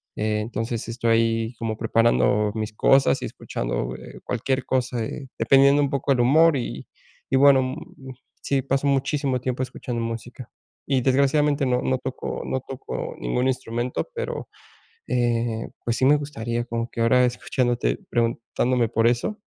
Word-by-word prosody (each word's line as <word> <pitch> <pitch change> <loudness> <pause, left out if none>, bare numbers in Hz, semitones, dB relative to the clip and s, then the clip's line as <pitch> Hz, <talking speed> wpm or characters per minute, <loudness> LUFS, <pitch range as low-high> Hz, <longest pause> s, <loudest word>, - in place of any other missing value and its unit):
eh, 105 0 0
entonces, 115 +1 -3
estoy 115 0 +1
como 115 -1 -2
preparando 110 -2 +2
mis 110 -1 -3
cosas 135 +5 +3
y - - -3
escuchando, - - -4
eh, 65 - -12
cualquier 130 +2 -1
cosa, 125 -2 -1
eh, 135 +5 -6
dependiendo 140 +1 +5
un 140 - +1
poco 140 0 +1
el 125 - +1
humor 155 +6 +5
y 90 - -4 0.4
y - - +1
bueno, 135 0 +6
mm, 130 +1 -7 0.3
sí, 140 -1 0
pasó 135 +1 0
muchísimo 135 -1 0
tiempo 130 0 -2
escuchando 125 -2 -5
música. 115 +1 -6 0.4
Y 135 -2 +2
desgraciadamente, 140 +2 +2
no 125 -1 +1
no 130 - 0
toco 130 0 -5
no 130 - -2
toco 135 +1 -6
ningún - - 0
instrumento, 120 -1 -2
pero, 470 - -4 0.6
eh, 120 -2 0 0.2
pues, 120 -1 0
sí 130 - +3
me 145 - +6
gustaría 120 -5 -3
como 115 0 -3
que 115 - -2
ahora 125 +2 +4
escuchándote, 120 - -1
preguntándome 120 +1 0
por 115 +1 +1
eso, 120 - +1
125 Hz, 155 wpm, -24 LUFS, 115-135 Hz, 0.6 s, bueno